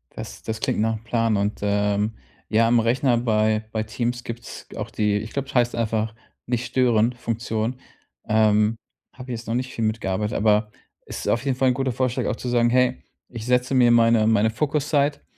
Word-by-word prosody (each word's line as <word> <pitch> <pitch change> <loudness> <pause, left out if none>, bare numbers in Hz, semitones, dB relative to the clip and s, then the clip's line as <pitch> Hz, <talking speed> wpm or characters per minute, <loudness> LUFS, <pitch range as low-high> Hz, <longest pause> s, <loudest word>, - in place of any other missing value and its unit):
Das - - -8
das 110 -1 -4
klingt - - -1
nach 115 +1 +1
'm 110 - -16
Plan, 115 -2 +1
und, 100 +1 -1
ähm, 105 +1 +1 0.4
ja, 115 +1 +3
am 120 0 +4
Rechner 120 +2 +2
bei 110 -2 +1
bei 110 -1 -1
Teams 120 +2 -3
gibt's 120 0 -8
g - - -11
auch - - -5
die 105 -1 +1
ich 110 +2 -6
glaube, 140 -1 -3
das - - -11
heißt 120 0 +2
einfach 110 -1 -1 0.3
Nicht-Stören-Funktion. 120 -1 0 0.5
Ähm, 110 0 +3 0.4
habe 130 0 -8
jetzt 115 0 -6
noch 115 - -1
nicht 130 +1 -3
viel 115 - -3
mitgearbeitet, 105 -1 -1
aber 105 0 +2 0.3
ist - - -6
auf 120 +3 +1
jeden 130 -2 0
Fall 130 -1 +3
'n - - +2
guter 135 0 -1
Vorschlag 125 0 -1
auch - - -1
zu 125 - -7
sagen: 120 -1 +3
„Hey, 125 +1 +2 0.3
ich 115 -2 -7
setze 125 +1 +1
mir 125 -2 +5
meine 115 -2 +4
meine 110 0 +3
Fokuszeit, 145 +2 0
115 Hz, 190 wpm, -23 LUFS, 110-125 Hz, 0.5 s, mir